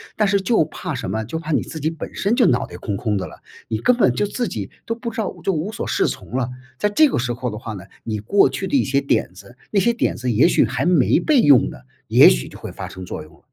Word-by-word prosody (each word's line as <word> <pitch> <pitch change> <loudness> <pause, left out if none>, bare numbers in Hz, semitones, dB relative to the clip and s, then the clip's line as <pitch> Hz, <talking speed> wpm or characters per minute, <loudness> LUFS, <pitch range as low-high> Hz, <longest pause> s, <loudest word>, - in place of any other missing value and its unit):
但 215 - +2
是 200 0 +2
就 195 -1 +2
怕 170 0 -6
什 120 -7 -4
么， 110 +2 -2
就 160 +9 -4
怕 160 0 -5
你 145 - +2
自 160 - -8
己 155 - 0
本 165 -1 -7
身 205 +5 0
就 245 - +4
脑 120 - +2
袋 - - -10
空 100 - -4
空 105 -1 -1
的 95 - -3
了， - - -12 0.3
你 110 -1 -2
根 250 - +3
本 130 - +4
就 205 - 0
自 240 +3 -2
己 100 -3 -5 0.2
都 230 - -1
不 235 0 -5
知 225 - -10
道 215 -4 -2
就 - - +1
无 180 +5 -2
所 - - -5
适 - - +1
从 125 - -5
了， 125 -1 -1 0.3
在 210 - +1
这 295 +8 +4
个 - - -1
时 120 0 -1
候 125 +1 -3
的 105 - -6
话 110 -1 -6
呢， 95 -1 -8 0.2
你 110 -2 -3
过 195 - +4
去 190 - -4
的 280 - +2
一 - - +2
些 135 +1 +1
点 135 -9 0
子 100 +7 -15
那 200 - +3
些 235 - +3
点 235 - -1
子 125 0 -2
也 120 +9 +5
许 175 - +3
还 125 +5 -2
没 170 -8 +4
被 300 -4 +3
用 140 - +5
呢， - - -11 0.3
也 - - +8
许 65 0 0
就 - - -12
会 - - -7
发 - - -7
生 95 - -9
作 80 -3 -6
用 75 - -17
了。 - - -21
140 Hz, 320 characters per minute, -21 LUFS, -, 0.3 s, 也